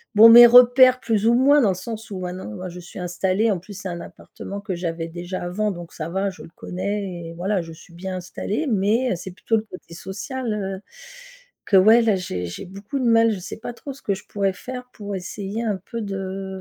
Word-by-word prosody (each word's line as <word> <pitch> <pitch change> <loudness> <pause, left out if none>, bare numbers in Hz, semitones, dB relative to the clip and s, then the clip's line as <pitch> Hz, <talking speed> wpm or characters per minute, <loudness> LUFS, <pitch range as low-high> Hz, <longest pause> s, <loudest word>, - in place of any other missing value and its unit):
bon, 220 +2 +10
mes 240 +1 +11
repères 250 +1 +7
plus 225 -3 0
ou 235 - +5
moins 280 +3 +5
dans 215 - +3
le - - +2
sens 220 +3 -7
où 190 - -5
maintenant, 180 - -6
moi 185 - -6
je 180 +1 -9
suis 175 +2 -10
installée, 185 +5 0
en 195 - 0
plus 190 +4 -12
c'est 195 -1 -6
un 175 -1 -5
appartement 200 +1 -9
que 195 -3 -4
j'avais 165 -1 -3
déjà 175 +2 -6
avant 205 +4 -1
donc 175 -2 -9
ça 160 0 -5
va, 190 +3 -1
je - - -12
le - - -12
connais 185 -2 -4
et - - -9
voilà, 190 +2 -1
je 165 0 -10
suis 170 +1 -16
bien 185 +1 -5
installée. 205 - -3
Mais, 220 +5 +2
heu, - - -2
c'est 185 +1 -8
plutôt 225 +4 -1
le 215 - -2
côté 185 -5 -12
social, 215 +7 -5
heu, 195 -2 -4 0.9
que 195 - +4
ouais, 220 +5 +7
là 220 -3 +3
j'ai 90 - -4
j'ai 85 - -7
beaucoup 200 +8 -6
de 250 - -1
mal, 230 -1 +5
je 200 - -3
sais 180 - -7
pas 235 - -6
trop 275 +3 -8
ce 275 - -16
que 200 - 0
je 190 - -12
pourrais 200 -1 0
faire 250 +5 -7
pour 205 -1 -6
essayer 195 +4 -5
un 210 -4 -1
peu 230 -2 -4
de 195 -1 -5
195 Hz, 240 wpm, -22 LUFS, 180-225 Hz, 0.9 s, mes